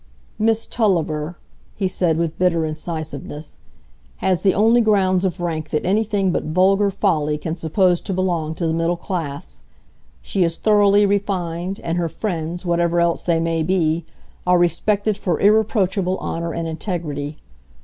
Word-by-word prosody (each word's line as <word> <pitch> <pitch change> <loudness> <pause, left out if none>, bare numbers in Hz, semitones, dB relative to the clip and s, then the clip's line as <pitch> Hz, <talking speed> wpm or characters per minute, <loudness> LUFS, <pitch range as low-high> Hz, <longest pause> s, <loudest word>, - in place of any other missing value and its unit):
"Miss 225 +1 +2
Tulliver," 170 -7 0 0.4
he 195 - 0
said, 175 -3 +1
with 165 -1 -2
bitter 170 -3 +2
incisiveness, 155 -1 -6 0.6
"has 185 -2 0
the 190 -1 +3
only 225 +4 +4
grounds 195 -4 +2
of 185 -1 -1
rank 160 -3 -3
that 150 - -1
anything 200 -1 +1
but - - -1
vulgar 195 +5 +3
folly 160 -7 0
can 160 +2 -4
suppose 175 +2 +2
to - - -5
belong 175 -4 -1
to 170 - -2
the 160 - 0
middle 165 +1 0
class; 145 - -5 0.6
she 180 - -1
is 165 -1 -1
thoroughly 205 -1 +4
refined, 190 -2 -1
and 170 +1 -1
her 170 -1 -1
friends, 170 -1 -4
whatever 170 0 +1
else 170 0 +1
they 170 -2 +1
may 165 0 0
be, 165 -1 +1 0.4
are 180 0 +5
respected 205 +4 +1
for 175 -4 -1
irreproachable 200 -3 +2
honour 170 0 -3
and 165 0 -3
integrity. 155 -3 -4
175 Hz, 150 wpm, -21 LUFS, 160-195 Hz, 0.6 s, are